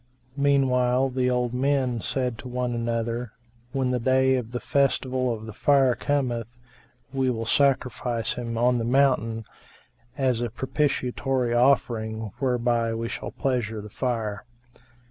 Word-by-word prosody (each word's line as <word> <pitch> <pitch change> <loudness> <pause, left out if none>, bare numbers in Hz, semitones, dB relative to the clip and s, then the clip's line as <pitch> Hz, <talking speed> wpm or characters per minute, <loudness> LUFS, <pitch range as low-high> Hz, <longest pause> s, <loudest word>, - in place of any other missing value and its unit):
Meanwhile, 135 -2 +3
the 125 0 +1
old 125 -1 0
men 130 -2 +1
said 125 -2 -2
to - - -8
one 125 0 -2
another, 115 0 -2 0.4
"When 130 -1 0
the 125 - 0
day 130 +2 +3
of 125 -3 -2
the 125 - -3
Festival 130 -2 +1
of 110 -1 -5
the 110 - -8
Fire 135 +2 +4
cometh, 125 -5 -1 0.7
we 135 -1 +1
will 115 -2 -2
sacrifice 125 -2 +1
him 115 -2 -4
on 120 +1 +3
the - - -1
mountain, 120 -3 +2 0.7
as 130 -4 +1
a 120 - -1
propitiatory 130 -1 -1
offering 110 -4 +1
whereby 120 -3 +1
we 115 +1 -3
shall - - -5
pleasure 120 -5 -2
the 105 0 -9
Fire." 115 -5 -2
125 Hz, 140 wpm, -25 LUFS, 115-130 Hz, 0.7 s, Fire